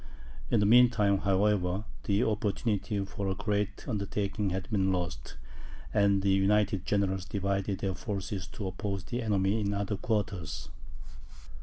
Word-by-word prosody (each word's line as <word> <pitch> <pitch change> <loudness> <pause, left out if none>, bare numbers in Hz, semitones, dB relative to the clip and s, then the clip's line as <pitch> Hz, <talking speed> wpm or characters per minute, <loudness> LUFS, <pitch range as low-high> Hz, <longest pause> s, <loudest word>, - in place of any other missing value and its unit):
In 115 - +3
the 105 - +3
mean 120 +3 +7
time, 100 -4 +2
however, 95 -1 +1 0.2
the 100 +3 +2
opportunity 105 -1 -1
for 100 0 -4
a 95 - 0
great 105 0 -2
undertaking 100 -2 -1
had 95 0 -3
been 95 -3 +2
lost, 85 -10 -3 0.6
and 100 -2 +3
the 100 - +3
united 95 0 +2
generals 95 -2 +1
divided 100 0 -1
their 95 -1 0
forces 100 -1 -4
to 100 - -7
oppose 95 0 -3
the 120 +5 -3
enemy 105 -1 +1
in 100 0 0
other 100 0 -2
quarters. 95 - -2
100 Hz, 145 wpm, -30 LUFS, 95-105 Hz, 0.6 s, mean